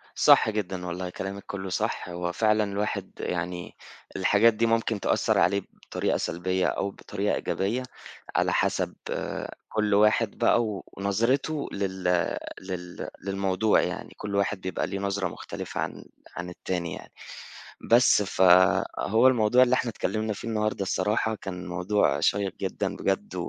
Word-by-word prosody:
صح - - +6
جدًا، 95 -4 -3
والله 90 +1 -4
كلامِك 100 +2 -6
كلّه 95 -1 -5
صح، 90 - -2
هو 85 0 -3
فعلًا 110 +3 +2
الواحد 100 +1 -3
يعني 90 0 -4 0.4
الحاجات 105 +4 +4
دي 115 +2 +1
ممكن 115 -2 +1
تأثّر - - +1
عليه 100 0 +3
بطريقة - - -2
سلبيّة 90 +2 -1
أو 100 - -1
بطريقة 100 +1 -2
إيجابية، 115 +7 -1 0.5
على - - +2
حَسَب - - 0 0.8
كُلّ 105 -1 0
واحد 105 +1 +3
بقى 120 - +3
و 105 -3 -4
ونظرته 120 +10 0
لل 95 -1 -3 0.6
لل 90 -2 -6
للموضوع 100 +2 +2
يعني، - - -4
كُل 100 -1 -4
واحد 100 0 0
بيبقى 95 -2 -2
ليه 95 0 -4
نظرة 100 -1 -1
مختلفة 85 - -6
عن، - - -4 0.3
عن 90 0 -5
التاني 90 -2 -4
يعني، - - -10 0.8
بس 120 -3 +6
فهو 95 +4 +4
الموضوع 125 0 +5
اللي 130 0 +2
إحنا 125 - 0
اتكلمنا 110 0 -2
فيه 110 - -8
النهارده 110 -2 -1
الصراحة 110 +3 0
كان 90 -3 -7
موضوع 90 +4 +1
شيق 100 -2 +1
جدًا - - -2
بجد، - - -2
100 Hz, 140 wpm, -27 LUFS, 95-110 Hz, 0.8 s, صح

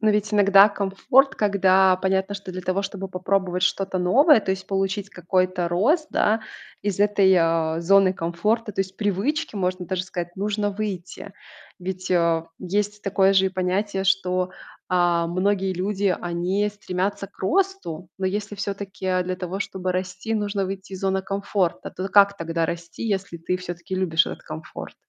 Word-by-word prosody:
Но 215 0 +3
ведь 210 0 0
иногда 200 0 +7
комфорт, 215 +7 +2
когда 190 -2 +4
понятно, 190 +1 0
что 200 -2 -7
для 185 - -5
того, 185 +2 -1
чтобы 195 -1 -5
попробовать 185 0 -1
что-то 190 0 0
новое, 265 - +5
то 190 - -3
есть 190 0 -3
получить 195 +1 -1
какой-то 185 -1 0
рост, 285 - +2
да, 220 +2 +2 0.4
из 200 -1 -2
этой, 200 -2 +4
а, 165 -1 +1
зоны 195 +2 +5
комфорта, 210 +7 -1
то 195 - -2
есть 190 0 -12
привычки, 220 - -1
можно 185 -1 -2
даже 185 0 -2
сказать, 175 -1 -6
нужно 205 +1 -1
выйти. 195 -2 -5 0.5
Ведь, 185 0 -5
э, 170 -2 +2
есть 205 +3 -2
такое 195 -1 +3
же 190 -1 +4
и - - +2
понятие, 190 +1 -1
что, 185 -1 +1 0.4
а, 175 -2 +2
многие 190 +2 0
люди, 190 +1 0
они 180 +4 -1
стремятся 200 -1 -3
к - - -29
росту. 350 - -1
Но 190 - -1
если 205 +2 -3
всё-таки 195 -2 -2
для 185 0 -3
того, 185 +1 -4
чтобы 190 -2 -3
расти, 185 +4 -3
нужно 205 -2 -1
выйти 195 0 -7
из 190 - -6
зоны 190 0 0
комфорта, 195 -2 -2
то 185 +2 -5
как 200 0 +5
тогда 165 -1 -1
расти, 170 +3 -6
если 195 -4 -2
ты 180 +2 -1
всё-таки 180 +1 -6
любишь 170 -3 +2
этот - - -7
комфорт? 155 0 -8
190 Hz, 165 wpm, -23 LUFS, 180-200 Hz, 0.5 s, иногда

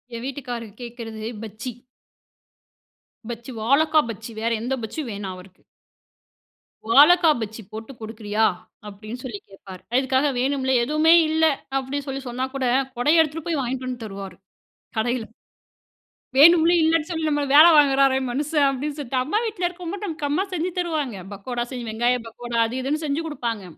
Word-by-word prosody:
என் 230 - -6
வீட்டுக்காரர் 245 -6 -6
கேட்கிறது 230 -2 -7 0.2
பஜ்ஜி. 220 +3 -6 1.6
பஜ்ஜி 235 +2 -7
வாழக்கா 305 +7 +4
பஜ்ஜி 225 +1 -7
வேற 230 +1 0
எந்த 245 +3 -2
பஜ்ஜியும் 250 +4 -5
வேணாம் 200 -2 -5
அவருக்கு. 185 0 -15 1.3
"வாழக்கா 325 +5 +7
பஜ்ஜி 220 +1 -6
போட்டு 220 +3 -8
குடுக்கிறியா?" 220 0 -1 0.4
அப்டின்னு 215 +4 -8
சொல்லி 235 -6 -6
கேட்பாரு. 190 -1 -12
அதுக்காக 265 +2 +2
வேணும்லே, 265 0 0
எதுவுமே 305 +5 +4 0.2
இல்ல. 320 +1 +3 0.3
அப்டின்னு 270 +1 -3
சொல்லி 270 0 -4
சொன்னா 250 +2 -2
கூட, 270 -1 -1 0.3
கொடைய 295 +7 +4
எடுத்துட்டு 320 0 -2
போய் 325 -4 0
வாங்கிட்டு 255 +1 -3
வந்து 250 -2 -5
தருவாரு 195 -2 -8 0.6
கடையில. 240 +1 0 1.1
"வேணும்லே 335 +3 +7
இல்லன்னு 320 0 +2
சொல்லி 320 -2 -2
நம்மள 290 -1 0
வேல 310 +3 +10
வாங்குறாரே 275 -2 +4
மனுஷன்" 295 +2 +1
அப்டின்னு 280 +2 -3
சொல்ட்டு 265 -2 -3
அம்மா 310 +11 -1
வீட்ல 400 -5 -1
இருக்கும்போது 360 +3 -6
நமக்கு 310 -5 -3
அம்மா 315 +7 +1
செஞ்சு 355 +1 -1
தருவாங்க. 310 - -2 0.2
பக்கோடா 240 +4 -4
செஞ்சு 245 -3 -5
வெங்காயம் 240 +2 0
பக்கோடா, 240 +1 -5
அது 235 - -6
இதுன்னு 300 +4 -2
செஞ்சு 295 +2 -1
குடுப்பாங்க. 235 -9 -4
260 Hz, 145 wpm, -23 LUFS, 230-305 Hz, 1.6 s, வேல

